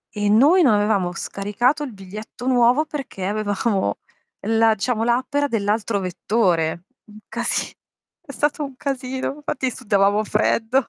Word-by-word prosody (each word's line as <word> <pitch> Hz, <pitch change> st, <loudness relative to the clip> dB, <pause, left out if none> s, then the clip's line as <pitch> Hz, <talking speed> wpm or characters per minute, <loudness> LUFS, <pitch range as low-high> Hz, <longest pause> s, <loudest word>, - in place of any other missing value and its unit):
e 205 Hz, 0 st, 0 dB
noi 285 Hz, -, +5 dB
non 260 Hz, -10 st, +5 dB
avevamo 205 Hz, -4 st, +1 dB
scaricato 225 Hz, -, -1 dB
il 265 Hz, -5 st, -6 dB
biglietto 210 Hz, +5 st, -9 dB
nuovo 250 Hz, +3 st, +4 dB
perché 275 Hz, -11 st, -6 dB
avevamo 205 Hz, -, -1 dB, 0.5 s
la 225 Hz, 0 st, +4 dB
diciamo 220 Hz, +2 st, -1 dB
l'app 245 Hz, +4 st, 0 dB
era 285 Hz, 0 st, +2 dB
dell'altro 215 Hz, -2 st, 0 dB
vettore. 180 Hz, -3 st, 0 dB, 0.2 s
Un 210 Hz, -1 st, -15 dB
casi 235 Hz, +2 st, -2 dB, 0.5 s
è 280 Hz, -, -8 dB
stato 295 Hz, +2 st, -1 dB
un 275 Hz, -2 st, -7 dB
casino, 265 Hz, -1 st, -3 dB
infatti 270 Hz, -3 st, -2 dB
sudavamo 205 Hz, -2 st, +1 dB
freddo. 225 Hz, +4 st, +1 dB
225 Hz, 140 wpm, -22 LUFS, 205-260 Hz, 0.5 s, noi